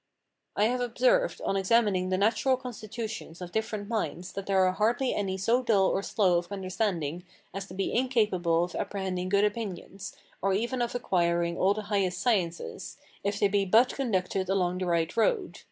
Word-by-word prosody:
I 205 - +2
have 245 +3 +1
observed, - - +2
on - - 0
examining 195 -2 +2
the 185 - +1
natural 225 +6 +2
constitutions 220 -7 -7
of 180 -1 -7
different 215 -1 -3
minds, 205 -5 -3
that 195 - -6
there 190 -1 +4
are 185 - +3
hardly 235 +7 +1
any 190 -2 -2
so 230 +6 +2
dull 200 -6 +3
or 195 - 0
slow 185 -4 +2
of 175 +2 -10
understanding 185 -4 -2 0.3
as 195 +1 -5
to 185 - -10
be 195 - -2
incapable 210 -10 +2
of 175 - -5
apprehending 185 -2 -3
good 200 +1 +3
opinions, 200 -2 -5 0.3
or 195 0 +1
even 240 +5 -1
of 240 0 -2
acquiring 170 -6 +1
all 195 +3 +2
the 215 - -4
highest 185 -3 +1
sciences, 185 -7 -1 0.3
if 200 0 -1
they 205 - +4
be 200 0 +1
but 225 +6 +4
conducted 190 -7 -1
along 180 -2 +1
the 185 - -2
right 170 +1 0
road. 370 - +1
200 Hz, 180 wpm, -28 LUFS, 185-225 Hz, 0.3 s, there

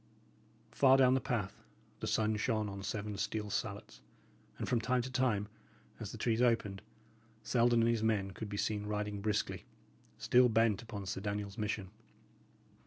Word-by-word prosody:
Far 135 -1 +5
down 130 -1 +5
the 130 - +2
path, 115 -8 -3 0.4
the - - -4
sun 110 0 +1
shone 110 -1 0
on 100 -1 -6
seven 105 +1 -4
steel 105 -1 -2
salets, - - -4 0.6
and - - -4
from 120 -2 +1
time 125 +1 +1
to 130 - -6
time, 125 -6 +1 0.5
as - - -5
the - - -7
trees 115 0 +1
opened, 115 -5 +1 0.6
Selden 120 +1 +3
and 115 - +3
his 115 -2 +1
men 105 -3 +1
could 105 +2 -7
be 100 - -4
seen 105 0 -1
riding 105 -1 -2
briskly, 105 +1 -1 0.5
still 125 0 +4
bent 115 -2 +3
upon 105 -4 -7
Sir 95 0 -4
Daniel's 100 0 -4
mission. 105 -3 -2
110 Hz, 165 wpm, -34 LUFS, 105-120 Hz, 0.6 s, Far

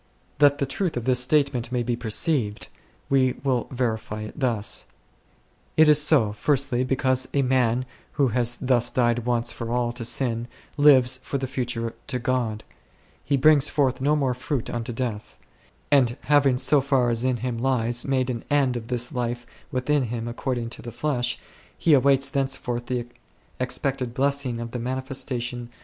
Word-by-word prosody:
That 145 -1 +5
the 140 - 0
truth 155 +3 -2
of 120 - -4
this 125 -1 +3
statement 130 -2 +1
may 125 -1 0
be 120 0 -1
perceived, 115 -1 0 0.4
we 130 -2 +2
will 130 -4 0
verify 110 -4 -3
it 110 - -8
thus. 115 -6 -1 0.9
It 155 0 +7
is 150 -1 +5
so, 145 -9 +4
first, 140 +5 +1 0.2
because 130 -1 +1
a 140 - +3
man 125 -1 +1 0.3
who 140 -3 +2
has 120 0 0
thus 125 -2 +2
died 120 -1 0
once 120 -1 0
for 115 - -6
all 120 -1 0
to 120 0 -7
sin 120 -1 0 0.3
lives 130 -4 +5
for 140 - -3
the 135 - -3
future 120 -3 -3
to 130 - 0
God; 120 -3 -2 0.6
he 140 - +1
brings 150 +1 +5
forth 135 -3 0
no 145 +3 +2
more 135 -4 +1
fruit 130 0 -3
unto 120 0 -4
death; 115 -3 -5 0.5
and 130 -3 +3
having 140 -3 +3
so 145 +2 +3
far 130 -3 +1
as 115 +1 -1
in 130 -1 +1
him 120 -1 -3
lies 120 -2 +1
made 130 -2 0
an 115 -2 -5
end 140 -3 +2
6 115 -2 -5
of - - -15
this 125 +1 -1
life 120 -2 -3 0.3
within 130 +2 0
him 115 0 -4
according 120 -1 -3
to - - -8
the 120 - -8
flesh, 125 -1 -1 0.4
he 160 - +3
awaits 135 0 +4
thenceforth 135 -3 -2
the 125 -2 -2 0.5
expected 125 -1 -2
blessing 140 -3 0
of 115 0 -6
the 125 - -4
manifestation 125 -1 -4
125 Hz, 170 wpm, -24 LUFS, 120-135 Hz, 0.9 s, It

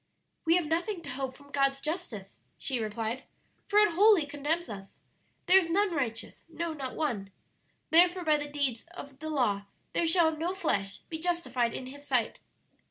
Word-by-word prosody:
"We 330 +1 +5
have 355 -2 +2
nothing 340 +4 -1
to - - -6
hope 260 0 -4
from 285 0 -17
God's 275 -1 +2
justice," 275 - -5 0.2
she 260 -3 -1
replied, 225 +3 -3 0.5
"for 410 - +1
it 420 -3 +6
wholly 400 -3 +6
condemns 295 +4 -2
us. 195 -3 -9 0.5
'There 380 +1 +8
is 335 -3 -3
none 390 +2 +2
righteous, 240 -7 -3
no, 330 0 -3
not 270 -4 -6
one.... 230 -11 -2 0.6
Therefore 350 +2 +6
by 305 -1 +4
the 290 0 -4
deeds 280 -5 -1
of 275 -5 -10
the 315 +1 -5
law 215 -9 +1 0.3
there 335 - +2
shall 325 -1 +4
no 340 +4 -2
flesh 200 - -1
be 320 - -4
justified 260 -9 0
in 255 - -5
His 285 +3 -10
sight.' - - +1
295 Hz, 175 wpm, -30 LUFS, 255-340 Hz, 0.6 s, There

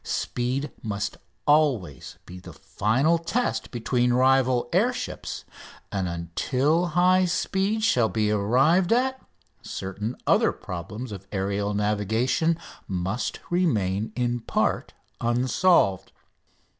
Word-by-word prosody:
Speed 130 +4 -2
must 105 -2 -3 0.3
always 140 - +1
be 90 +1 -10
the 90 - -11
final 135 +11 +1
test 235 +9 -1
between 120 0 0
rival 130 -1 +3
air 215 +8 +3
ships, 245 - -6 0.5
and 95 -2 -1
until 130 - 0
high 185 +1 +5
speed 195 +4 0
shall 120 - +3
be 105 -1 0
arrived 135 - +3
at 260 +2 +1 0.4
certain 105 +5 -5
other - - +4
problems 105 +7 -7
of 100 -1 -8
aerial 100 +1 -1
navigation 110 - +1 0.3
must 95 +5 -3
remain 110 - +1
in 120 -1 0
part 115 - -1 0.3
unsolved. 120 - +2
120 Hz, 105 wpm, -25 LUFS, 100-160 Hz, 0.5 s, high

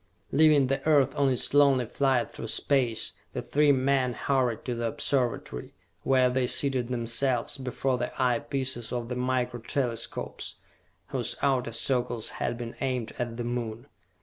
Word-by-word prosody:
Leaving 150 -1 +5
the 135 +1 -1
earth 145 -4 +4
on 140 -1 +3
its 130 +1 0
lonely 140 -3 +5
flight 130 +1 +1
through - - -7
space, 125 -6 +1 0.2
the - - -3
three 150 0 +3
men 130 -1 +2
hurried 125 -1 0
to 125 - -1
the 115 0 -2
Observatory, 125 - -2 0.3
where 130 -1 +3
they 125 0 +1
seated 130 -2 +1
themselves 120 +1 0
before 130 0 -1
the - - -2
eye 125 -2 +2
pieces 130 -5 -2
of 120 -1 -3
the 125 - -2
Micro 125 -1 -1
Telescopes, 115 -1 -3 0.5
whose - - -1
outer 130 -3 +1
circles 120 -1 0
had 120 - -1
been 120 -1 -6
aimed 125 -4 -1
at 120 -1 -3
the 120 - -3
Moon. 120 -1 -4
125 Hz, 155 wpm, -28 LUFS, 120-135 Hz, 0.5 s, Leaving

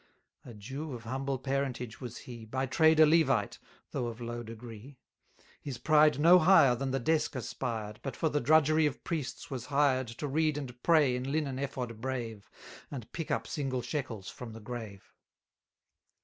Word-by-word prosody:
A 120 - -11
Jew 135 +8 -6
of 120 -2 -7
humble 135 +3 -2
parentage 130 -3 -3
was 125 -2 -6
he, 120 -2 -9
By 130 +4 -2
trade 160 +4 +4
a 155 - +9
Levite, 140 -9 +2 0.3
though 120 - -2
of 115 0 -6
low 120 0 -5
degree: 115 +3 -10 0.6
His 135 -4 -5
pride 150 -1 +4
no 170 +4 +7
higher 155 -7 +6
than 135 +2 -2
the 135 - 0
desk 155 +3 +1
aspired, 115 -4 -4
But 135 - -5
for 160 - 0
the 150 -1 0
drudgery 155 0 +4
of 145 - -6
priests 155 0 -4
was 125 -2 -5
hired 135 -2 +2
To 115 +6 -5
read 155 +1 +1
and 125 -4 -7
pray 150 -7 +4
in 130 +2 -3
linen 140 -4 -1
ephod 125 -5 -4
brave, 120 -5 -4 0.4
And 125 -6 -8
pick 165 -2 -5
up 115 0 -1
single 130 -3 -3
shekels 125 -7 -4
from 120 -3 -8
the 115 - -9
grave. 110 -3 -8
130 Hz, 175 wpm, -31 LUFS, 120-145 Hz, 0.6 s, a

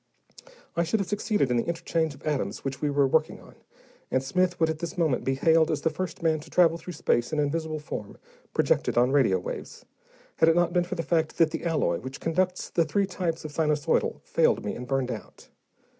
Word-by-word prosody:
I 170 - +2
should 170 +6 0
have 195 - -2
succeeded 205 - 0
in 120 - +2
the 115 - -1
interchange 165 -2 -1
of 140 - -18
atoms 150 -3 -2
which 135 -1 -4
we 150 - +1
were 140 -1 +3
working 135 - +1
on, - - -16 0.6
and 130 - +1
Smith 180 +6 0
would 160 - +4
at 160 -1 -3
this 170 +1 -5
moment 155 -7 +1
be 135 - 0
hailed 160 +3 +4
as 155 -2 -1
the 160 - +1
first 170 +1 -5
man 160 -1 +2
to 150 - -13
travel 170 -2 +4
through 180 - -8
space 120 -5 0
in 155 - -1
invisible 155 +2 -1
form, 110 -9 -7 0.3
projected - - +1
on 125 +2 +4
radio 130 -10 +4
waves, 90 - -7 0.5
had 160 - +5
it 165 - +4
not 175 -1 +2
been 175 -1 +2
for 180 - -4
the 165 - -2
fact 160 -2 0
that 165 -2 +4
the 165 - -4
alloy 150 - +1
which 130 +1 -8
conducts 180 +2 -1
the 170 - +3
three 180 +6 +1
types 175 -4 -3
of 155 - -5
sinusoidal 150 0 +1
failed - - +2
me - - -2
and 125 - -7
burned 130 -1 0
out. - - -9
160 Hz, 220 wpm, -27 LUFS, 140-170 Hz, 0.6 s, had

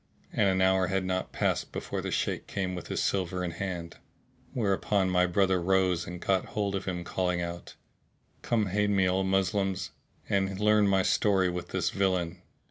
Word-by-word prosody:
And 100 -2 +3
an 95 0 +1
hour 95 -1 +3
had 95 -1 0
not 95 0 -2
passed - - -1
before - - -4
the - - -4
Shaykh - - -1
came 95 -2 -2
with 90 -2 -6
his - - -1
silver 90 -1 -1
in 90 - -2
hand; 85 -1 -5 0.5
where 110 -7 +1
upon 95 -1 +1
my 90 0 +3
brother 95 0 +2
rose 90 -1 +2
and 90 +1 -6
caught 95 +1 +1
hold 100 -2 -2
of 95 - -3
him 90 -2 -3
calling 90 0 -1
out, 85 0 -6 0.7
"Come 110 -4 0
aid 105 +1 +1
me, 95 -2 +3
O 95 +1 +1
Moslems, 95 0 0 0.4
and 95 -1 0
learn 105 0 +4
my 95 -1 +3
story 95 -3 +2
with 90 0 -5
this 95 -2 -1
villain!" 90 -3 0
95 Hz, 185 wpm, -29 LUFS, 90-100 Hz, 0.7 s, learn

